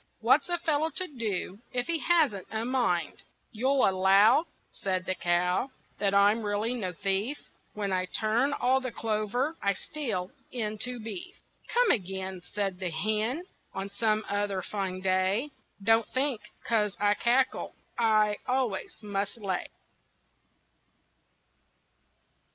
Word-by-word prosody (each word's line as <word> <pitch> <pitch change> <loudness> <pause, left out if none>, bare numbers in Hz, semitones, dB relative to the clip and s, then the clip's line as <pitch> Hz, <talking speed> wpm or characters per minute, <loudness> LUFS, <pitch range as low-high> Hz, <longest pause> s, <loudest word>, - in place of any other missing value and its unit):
What's 260 +9 +4
a 350 - +1
fellow 320 -2 +1
to 370 +3 -2
do 215 - -3
If 245 -1 -1
he 335 -1 0
hasn't 300 - +2
a 220 +1 -2
mind?" 240 -9 0 0.3
"You'll 260 +4 +3
allow," 195 - +5 0.2
Said 185 -2 -2
the 185 - 0
cow, 180 +6 +1 0.3
"That 200 -1 +2
I'm 205 +3 +5
really 210 +3 0
no 200 -7 -2
thief, 200 - -1 0.4
When 200 -2 -1
I 185 0 +1
turn 225 +8 +1
all 260 -1 +2
the 255 -2 -3
clover 225 +8 -1
I 200 - +2
steal, 210 -6 -4 0.2
into 235 +1 -2
beef." 350 - -6 0.4
"Come 485 -1 +4
again," 190 -3 -2
Said 195 -3 -2
the 185 -2 -2
hen, 215 - -1 0.3
"On 195 +1 -4
some 215 +1 +1
other 205 -2 -1
fine 190 -2 -3
day. 190 +8 +1 0.3
Don't 225 +2 +4
think 260 -4 0 0.2
'cause 210 -3 +1
I 205 0 +4
cackle 250 +4 +1 0.2
I 215 -2 +3
always 250 -5 -1
must 205 +1 -2
lay." 195 -5 -2
215 Hz, 130 wpm, -29 LUFS, 195-250 Hz, 0.4 s, allow